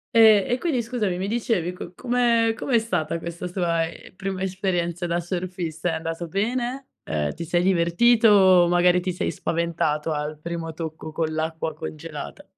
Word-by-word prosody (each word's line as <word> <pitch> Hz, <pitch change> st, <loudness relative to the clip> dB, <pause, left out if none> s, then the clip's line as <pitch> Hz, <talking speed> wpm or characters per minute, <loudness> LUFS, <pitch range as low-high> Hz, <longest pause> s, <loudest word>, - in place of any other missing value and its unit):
Ehm, 220 Hz, -3 st, +7 dB
e 245 Hz, -, +2 dB
quindi 270 Hz, -5 st, 0 dB
scusami, 220 Hz, -6 st, -2 dB
mi 190 Hz, -, -2 dB
dicevi, 220 Hz, -6 st, 0 dB
co 180 Hz, -1 st, -9 dB
come 235 Hz, -1 st, +2 dB
com'è 245 Hz, -3 st, +2 dB
stata 165 Hz, -8 st, -2 dB
questa 170 Hz, +1 st, -5 dB
tua, 170 Hz, -2 st, 0 dB
ehm, 175 Hz, -, -13 dB
prima 190 Hz, 0 st, -4 dB
esperienza 180 Hz, -2 st, -1 dB
da 170 Hz, 0 st, 0 dB
surfista? 175 Hz, -2 st, -3 dB
È -, -, -1 dB
andato 165 Hz, +1 st, -4 dB
bene? 245 Hz, +8 st, -2 dB, 0.2 s
Ehm, 75 Hz, -2 st, -2 dB
ti 170 Hz, -, -5 dB
sei 175 Hz, +1 st, +1 dB
divertito 190 Hz, +6 st, +4 dB
o 185 Hz, -3 st, +6 dB
magari 175 Hz, 0 st, +4 dB
ti 185 Hz, -, -2 dB
sei -, -, -2 dB
spaventato 165 Hz, -2 st, -1 dB
al 150 Hz, 0 st, -3 dB
primo 165 Hz, -1 st, -4 dB
tocco 160 Hz, -1 st, -6 dB
con 160 Hz, 0 st, -1 dB
l'acqua 160 Hz, 0 st, -3 dB
congelata? 80 Hz, -1 st, -7 dB
175 Hz, 165 wpm, -24 LUFS, 165-205 Hz, 0.2 s, Ehm